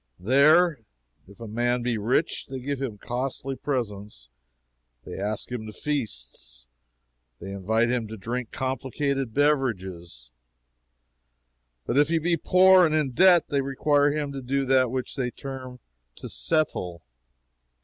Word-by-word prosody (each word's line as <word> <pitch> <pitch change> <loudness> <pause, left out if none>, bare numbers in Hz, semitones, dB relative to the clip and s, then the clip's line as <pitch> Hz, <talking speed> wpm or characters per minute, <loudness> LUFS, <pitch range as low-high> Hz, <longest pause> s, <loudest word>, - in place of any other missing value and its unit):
There, 145 - +4 0.5
if 100 +3 -17
a 115 - -7
man 120 +3 0
be 120 -1 0
rich, 125 +10 0
they 135 -1 -6
give 135 +1 -4
him 120 -6 -4
costly 130 +4 -4
presents, 105 - -4 0.8
they - - -7
ask 105 +4 -3
him 115 -3 -5
to - - -7
feasts, - - -4 0.7
they 95 - -7
invite 110 +5 0
him 120 -3 -1
to 110 +1 -8
drink 120 +4 -4
complicated 135 0 -2
beverages; 95 - -1 1.5
but 135 - +1
if 145 - +4
he 165 - +2
be 170 +2 +1
poor 185 +3 +6
and 155 -2 +2
in 150 -4 +1
debt, 175 +5 +5
they 140 -1 +1
require 145 +2 +2
him 145 -1 -2
to 135 -1 -6
do 135 +2 -1
that 130 -1 +3
which 130 +1 -3
they 125 -2 -1
term 130 -1 -8 0.4
to - - -9
'settle.' 90 - -1
130 Hz, 140 wpm, -25 LUFS, 110-145 Hz, 1.5 s, poor